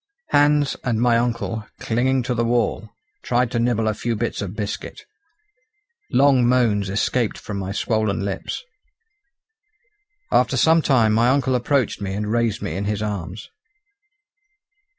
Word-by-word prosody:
Hans 145 -1 +3
and 115 -3 0
my 120 0 +3
uncle, 115 -2 -1
clinging 130 +3 0
to 125 +1 -1
the 115 0 0
wall, 115 -2 0 0.3
tried 125 0 0
to 120 - -1
nibble 115 -2 +1
a 110 - +1
few 115 +2 -2
bits 105 - -3
of 100 0 -5
biscuit. 105 -2 -5 1.0
Long 135 0 +4
moans 110 -6 +2
escaped 110 +3 0
from 100 -2 -6
my 95 0 -4
swollen 105 0 -1
lips. 100 - -4 1.7
After 130 +1 +2
some 160 +6 +4
time 120 -7 +3
my 115 +3 +3
uncle 130 -1 +2
approached 125 -2 0
me 95 -1 -3
and 105 +1 -3
raised 115 -3 0
me 100 - -3
in 100 +2 -3
his 105 0 -2
arms. 100 -1 -5
115 Hz, 145 wpm, -22 LUFS, 105-125 Hz, 1.7 s, Long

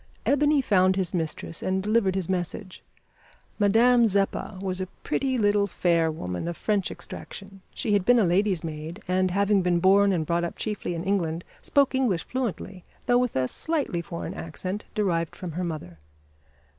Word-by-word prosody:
Ebony 290 0 +3
found 185 -4 +3
his 190 -3 -2
mistress 165 -1 -3
and 190 0 -1
delivered 210 -3 +2
his 190 -3 -1
message. 185 +1 -3 0.8
Madame 230 +4 +5
Zeppa 200 0 -1
was 185 -1 -2
a 185 - -3 0.2
pretty 265 -2 0
little 205 -2 +3
fair 170 -3 +2
woman, 90 - -4
of 170 -2 -4
French 205 -3 0
extraction. 195 0 -9
She 215 - -1
had 200 -2 +3
been 245 +5 +5
a 225 - +4
lady's 185 0 +2
maid, 160 +5 -6
and, 185 +1 +2
having 200 +2 +2
been 175 -1 +2
born 195 +2 +5
and 165 -4 0
brought 170 +2 0
up 170 - -4
chiefly 210 -5 -3
in 165 - -4
England, 175 -4 -1 0.2
spoke 280 -1 +2
English 240 -11 +1
fluently, 205 -7 -4 0.2
though 245 -1 +4
with 250 -1 -1
a 130 -1 +1
slightly 290 - -2
foreign 170 0 -6
accent 185 +5 -5
derived 170 -6 0
from 180 -2 -6
her 180 +4 -3
mother. 150 - -6
190 Hz, 170 wpm, -26 LUFS, 170-210 Hz, 0.8 s, Madame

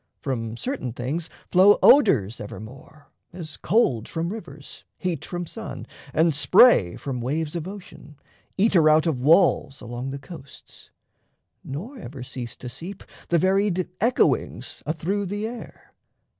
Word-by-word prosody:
From 115 -6 -4
certain 250 - -4
things 140 +8 -4 0.2
flow 190 +3 +6
odours 120 - +5
evermore, 130 +8 -11 0.2
As 165 -3 -8
cold 155 - +1
from 165 +1 -3
rivers, 145 -10 -11
heat 170 -6 -3
from 175 -1 -5
sun, - - -8 0.3
and 160 0 +3
spray 145 - +5
From 130 -3 -5
waves 150 +6 -2
of 170 0 -4
ocean, 185 -6 -11 0.4
eater 190 -6 +4
out 155 +1 +4
of 150 -7 -1
walls 155 -2 +3
Along 120 +3 -6
the 135 - -5
coasts. 140 0 -13 0.7
Nor 210 - -7
ever 130 - -8
cease 125 -1 -7
to 125 - -9
seep 170 +11 -8 0.3
The 170 - +3
varied 190 0 +1
echoings 245 +2 0
athrough 170 +6 -1
the 205 +3 -3
air. 235 +1 -9
160 Hz, 135 wpm, -24 LUFS, 130-190 Hz, 0.7 s, flow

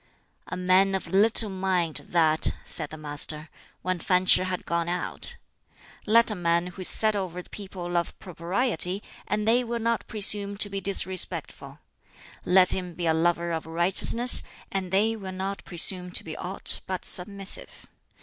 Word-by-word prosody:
"A 180 - -5
man 185 +2 +3
of 190 - -3
little 210 +2 +2
mind, 185 -4 -1
that!" 160 -2 +2
said 155 -3 -5
the 155 - -9
Master, 150 +1 -2 0.3
when 185 -1 -1
Fan 180 +2 +1
Ch'i 185 - +4
had 185 -1 -4
gone 170 0 -1
out. 175 0 -2 0.7
"Let 230 +1 +5
a - - -3
man 170 -1 +1
who 180 +1 -9
is 185 - 0
set 215 -1 +2
over 185 -3 -4
the - - -21
people 190 -3 -7
love 175 -1 -2
propriety, 185 +2 0 0.2
and 210 +1 -1
they 240 +3 +4
will 235 0 -3
not 230 0 -1
presume 205 -2 +2
to 205 0 +2
be 195 0 -3
disrespectful. 190 -1 -1 0.6
Let 185 0 +5
him 180 -2 -4
be 175 - -4
a 160 - +3
lover 170 +1 0
of 160 -1 -4
righteousness, 190 +9 +3 0.3
and 190 -2 -3
they 215 +4 +2
will 195 -3 -7
not 195 +1 -4
presume 180 +1 -1
to - - 0
be 160 - -7
aught 190 +2 +3
but 185 -1 -4
submissive. 195 +1 -1
185 Hz, 170 wpm, -26 LUFS, 175-200 Hz, 0.7 s, Let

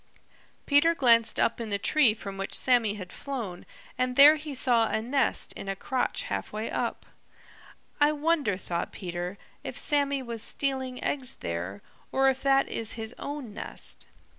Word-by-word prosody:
Peter 325 +4 +4
glanced 230 -5 +4
up 235 - +2
in 225 - -5
the 200 - +1
tree 245 +1 +3
from 200 -2 -7
which 195 0 -2
Sammy 235 -5 +3
had 185 -4 -9
flown 235 -11 -6 0.3
and 255 0 0
there 290 +3 +9
he 300 -2 -7
saw 240 -3 +3
a - - 0
nest 260 +5 0
in 195 - -7
a 195 - -1
crotch 255 +6 -2
halfway 215 +1 -4
up. - - -3 0.9
"I 295 0 +5
wonder," 300 - 0
thought 175 -2 -4
Peter, 175 +1 -5 0.3
"if - - -6
Sammy 280 -2 +1
was 235 -2 -6
stealing 260 -1 -2
eggs 260 -3 -1
there, 90 +4 -4 0.3
or 270 0 +4
if 265 0 -2
that 275 0 +3
is 225 -1 -2
his 225 0 -6
own 280 -7 -6
nest." - - -3
245 Hz, 165 wpm, -28 LUFS, 205-275 Hz, 0.9 s, there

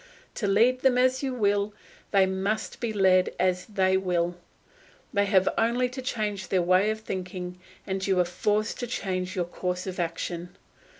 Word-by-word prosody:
To 205 - -2
lead 235 +6 +3
them 260 -2 +4
as 255 +1 +3
you 270 -2 -1
will, 205 -2 +1 0.3
they 195 -2 +4
must 190 +3 -2
be 235 -2 -2
led 190 -3 +3
as 180 0 +1
they 190 -3 +2
will. 175 -2 0 0.8
They 200 -1 +2
have 190 -2 +3
only 240 +2 +2
to 260 +1 -6
change 210 -6 -2
their 185 -2 +1
way 185 +4 +4
of 220 0 -2
thinking 180 -2 -5 0.3
and 190 0 -2
you 190 -2 +2
are 180 - +4
forced 210 +5 -1
to 245 - -3
change 185 -4 -3
your 180 -2 0
course 180 +1 -3
of 185 -1 -5
action. 170 +1 -4
195 Hz, 175 wpm, -27 LUFS, 180-215 Hz, 0.8 s, them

